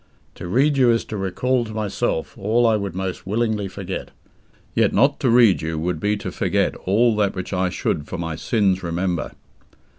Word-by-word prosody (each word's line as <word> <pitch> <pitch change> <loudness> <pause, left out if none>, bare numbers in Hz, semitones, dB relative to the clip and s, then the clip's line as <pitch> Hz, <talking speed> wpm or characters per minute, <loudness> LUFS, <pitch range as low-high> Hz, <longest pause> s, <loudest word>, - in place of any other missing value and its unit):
To - - -8
read 140 +9 +2
you 125 -2 +5
is 115 -1 +2
to 110 - -6
recall 120 +6 0
to 110 -1 -8
myself 105 -6 -2
all 110 +3 +1
I 115 -1 +4
would 100 -4 -3
most 95 -1 -4
willingly 110 -1 0
forget; 95 -1 -6 0.6
yet - - +2
not 140 +2 +3
to 130 - +1
read 115 -5 +5
you 80 0 -3
would 85 +1 -2
be 105 +4 0
to - - -5
forget - - 0
all 110 +4 +3
that 100 -2 +1
which 95 +1 -5
I 90 0 +1
should 75 -4 -2
for 95 - -5
my 80 -2 -3
sins 95 -1 +1
remember. 85 0 -2
100 Hz, 190 wpm, -22 LUFS, 90-115 Hz, 0.6 s, you